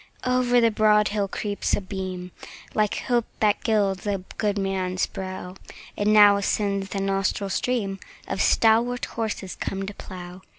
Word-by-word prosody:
Over 250 -1 +3
the 230 -1 +4
broad 210 0 +4
hill 205 -1 -1
creeps 205 +1 -1
a - - -2
beam, 185 -2 -6 0.4
Like 210 -1 0
hope 240 -3 0
that 210 -2 +2
gilds 205 -3 +1
a 195 -2 -1 0.2
good 205 -1 0
man's 190 -2 -1
brow; 185 -1 -6 0.4
10 205 - -2
And 210 - +4
now 205 -1 +8
ascends 200 -1 -1
the 195 - -3
nostril 195 0 -1
stream 200 -3 -1 0.3
Of 195 - -2
stalwart 235 +2 +3
horses 215 -4 -4
come 195 0 -4
to 205 - -6
plough. 180 -1 -9
200 Hz, 160 wpm, -25 LUFS, 195-215 Hz, 0.4 s, now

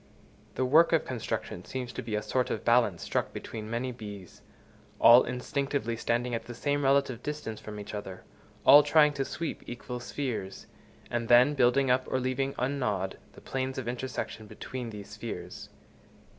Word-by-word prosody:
The 130 - +1
work 160 +6 +5
of 165 - +3
construction 125 -4 -4
seems 125 -2 -5
to - - -4
be 110 -2 -4
a 105 - -1
sort 130 -1 0
of - - -3
balance 115 -7 +3
struck - - -1
between 110 -1 -7
many 120 +3 -2
bees, 105 -6 -10 0.6
all 120 +2 +8
instinctively 135 -1 -2
standing 120 +2 -1
at 115 - -3
the 120 0 -8
same 145 +3 0
relative 135 -3 +2
distance 145 -7 -5
from 105 -1 -8
each 105 - -8
other, 95 -3 -6 0.4
all 145 +2 +10
trying 150 0 +4
to 140 -1 -1
sweep 165 +4 -4
equal 125 0 -6
spheres, 120 -7 -4 0.5
and 120 -1 -1
then 125 +4 +6
building 130 0 +3
up, 130 0 +2
or 130 - 0
leaving 130 +2 -1
ungnawed, 120 -8 -1 0.2
the - - -14
planes 130 0 -3
of 130 -3 -4
intersection 120 -3 -4
between 125 +2 -6
these 105 -2 -9
spheres. 105 -5 -7
125 Hz, 170 wpm, -29 LUFS, 110-135 Hz, 0.6 s, all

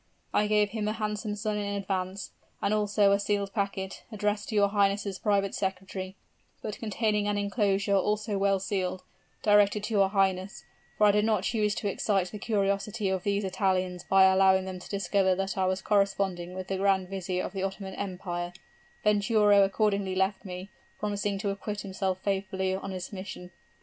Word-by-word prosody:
I 210 - +3
gave 210 -1 +2
him 215 -2 -2
a 215 - 0
handsome 210 -1 -3
sum 210 0 -2
in 200 -1 -2
advance, 190 -1 -3 0.3
and 205 - 0
also 205 -1 +3
a 200 - +3
sealed 200 -1 -1
packet, 195 -2 -3
addressed 210 -1 -1
to 220 - -3
your 200 -1 +4
highness' 200 -1 +1
private 200 -2 +1
secretary, 190 0 -4 0.5
but 210 -2 -5
containing 215 -1 0
an 205 0 0
inclosure, 200 -1 +1
also 210 +2 0
well 195 0 +2
sealed, 185 -1 -2 0.4
directed 205 0 +4
to 220 - -3
your 195 -2 +4
highness, 190 -1 0 0.3
for 210 - +5
I 205 - +7
did 210 +1 +2
not 215 -3 +1
choose 210 -2 +1
to 205 - -2
excite 195 -2 0
the 210 - -7
curiosity 200 0 0
of 190 -1 0
these 200 +1 0
Italians 185 -2 0
by 195 0 +5
allowing 190 0 +5
them 185 -1 -6
to 180 - -12
discover 195 -1 +1
that 195 +1 -2
I 190 -1 +1
was 185 0 -1
corresponding 195 -3 0
with 185 0 -6
the 195 - -1
grand 190 -1 +2
vizier 185 -1 -3
of - - -5
the 195 - -3
Ottoman 195 0 -4
Empire, 180 -3 -4 0.5
Venturo 210 -1 +4
accordingly 200 -1 +1
left 190 +1 0
me, 185 +1 -7 0.3
promising 205 -1 -1
to 200 0 -1
acquit 205 +1 -4
himself 190 -1 -2
faithfully 190 -1 -1
of 190 - -3
his 185 +1 -6
mission." 185 -2 -7
200 Hz, 180 wpm, -28 LUFS, 190-205 Hz, 0.5 s, I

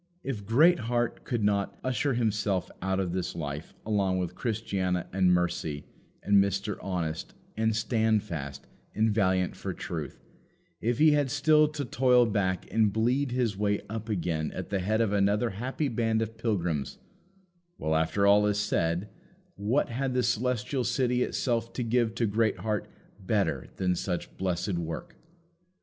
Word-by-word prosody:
If 110 -7 -4
Greatheart 120 -3 +3
could 120 -5 -1
not 100 -1 +1
"usher 130 +1 0
himself 105 -5 0
out 95 +1 0
of 90 -3 -1
this 90 -1 -2
life" 75 -1 -5
along 100 -3 +1
with 90 -1 -2
Christiana, 95 -5 -1
and 95 -1 +3
Mercy, 85 -4 0 0.4
and 100 -1 +5
Mr. 100 +1 -2
Honest, 85 -5 -3 0.2
and 110 0 +1
Standfast, 105 - -1 0.3
and 110 0 +2
Valiant 95 -3 +1
for - - -5
truth 75 -5 -5 0.6
if 120 +1 0
he 155 +2 +6
had 145 -2 +2
still 150 +3 +4
to 150 -2 -4
toil 125 0 +4
back 100 -4 0
and 110 -2 +3
bleed 125 +6 +1
his 120 -4 0
way 105 0 +1
up 110 0 -5
again 85 -6 -1
at - - -6
the 100 - +1
head 110 +5 +1
of 105 -3 +1
another 105 +3 +2
happy 130 +9 -2
band 115 -2 +1
of 115 0 -6
pilgrims 90 - -1 0.8
well, 80 - -1
after 80 +5 +2
all 105 +1 +5
is 105 0 +1
said, 85 -2 0 0.5
what 110 +8 0
had 130 +2 -2
the 125 - +2
Celestial 125 +2 0
City 125 -1 +1
itself 115 -2 -1
to 125 - -2
give 115 -1 +1
to 115 - +1
Greatheart 110 -1 0 0.3
better 95 -8 0
than 90 -1 0
such 90 0 -3
blessed 90 0 -1
work? 85 -1 -5
105 Hz, 155 wpm, -28 LUFS, 95-120 Hz, 0.8 s, he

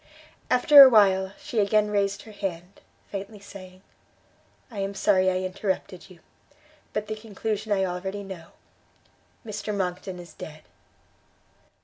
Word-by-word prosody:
After 280 +3 +8
a 270 - +11
while, 190 -4 +4
she 230 - -3
again 210 +1 +2
raised 200 -1 0
her 220 - -13
head, 190 -3 -6 0.3
faintly 200 +2 -6
saying, 185 -2 -13 0.9
"I 210 - -7
am 195 0 -3
sorry 190 -2 +3
I 185 0 -1
interrupted 190 -1 -4
you; 180 -2 -17 0.7
but 210 - -3
the 215 +1 -4
conclusion 215 0 -5
I 190 -1 +2
already 190 +3 -4
know, 190 -4 -9 1.0
Mr 210 -1 -4
Monckton 180 0 -3
is 175 -2 -11
dead!" 155 0 -10
195 Hz, 130 wpm, -25 LUFS, 185-210 Hz, 1.0 s, a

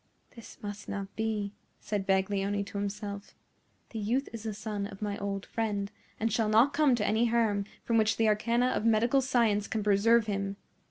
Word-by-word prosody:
"This 230 -3 -12
must 205 0 -6
not 195 -1 -5
be," 215 -2 -2 0.3
said 205 -2 -3
Baglioni 195 +1 +1
to 200 - -5
himself. 200 0 -5 0.6
"The 225 - -4
youth 240 +7 0
is 230 - -6
the 220 -1 -4
son 210 -1 -4
of 195 -1 -11
my 205 -1 -1
old 200 -1 -3
friend, 205 -3 -2 0.3
and 225 -1 0
shall 220 -1 +1
not 230 +6 +5
come 285 -3 +4
to 210 -3 -1
any 220 +3 +2
harm 225 -4 +1 0.2
from 230 -1 +2
which 220 0 +2
the 225 - +3
arcana 235 +4 +2
of 255 - -1
medical 230 +4 +3
science 230 -6 +2
can 220 -2 -2
preserve 210 +3 +4
him. 195 -1 -2
215 Hz, 185 wpm, -30 LUFS, 200-230 Hz, 0.6 s, not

